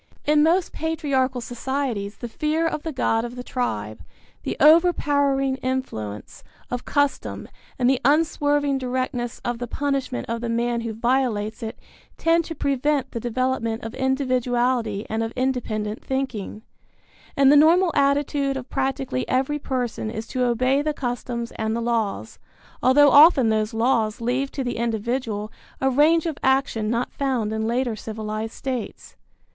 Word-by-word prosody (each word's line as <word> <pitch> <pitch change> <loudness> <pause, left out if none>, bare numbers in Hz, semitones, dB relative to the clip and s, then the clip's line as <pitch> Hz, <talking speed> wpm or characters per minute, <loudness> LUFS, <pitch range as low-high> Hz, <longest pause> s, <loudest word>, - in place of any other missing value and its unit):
In 300 0 +4
most 335 +4 +3
patriarchal 280 -6 -1
societies 240 -4 -3
the 240 - -6
fear 305 +7 -1
of 315 -2 -1
the 320 - -4
god 225 -4 +1
of 240 +1 -6
the 250 - -6
tribe, 110 - -3 0.4
the - - -4
overpowering 285 -5 +4
influence 180 - -4 0.3
of 245 0 -3
custom 285 -1 -1 0.3
and 245 - +2
the 265 0 +2
unswerving 290 -1 +2
directness 250 -2 -3
of 240 -1 -2
the 245 - -4
punishment 275 -1 -2
of 230 0 -3
the 235 - -3
man 235 0 0
who 230 -1 -3
violates 225 -2 0
it 225 -1 -5 0.4
tend 330 0 +2
to 325 - -6
prevent 280 -1 0
the 230 - -4
development 240 -1 -1
of 225 +1 -6
individuality 250 -4 0
and 220 +1 -2
of 225 +1 -3
independent 230 -5 -2
thinking; 250 -6 -3 0.7
and 275 0 +6
the - - +7
normal 335 +4 +5
attitude 280 -1 +1
of 255 -1 -8
practically 265 - -2
every 270 +3 0
person 245 -5 -3
is 220 0 -5
to 255 +2 -2
obey 255 +3 +2
the 300 0 -2
customs 240 -2 -4
and 220 0 -1
the - - -1
laws, 230 -3 -2 0.4
although 285 +2 +6
often 285 -5 +7
those 215 0 +1
laws 225 -1 +1
leave 255 +4 -1
to 270 - -3
the 245 - -3
individual 225 -1 -2 0.3
a 265 0 +2
range 310 +5 +4
of 320 -3 -3
action 265 -5 +1
not 235 +2 -1
found 250 -6 -1
in 220 0 -1
later 240 0 0
civilized 215 +1 -5
states. 255 -5 -5
255 Hz, 150 wpm, -23 LUFS, 230-275 Hz, 0.7 s, the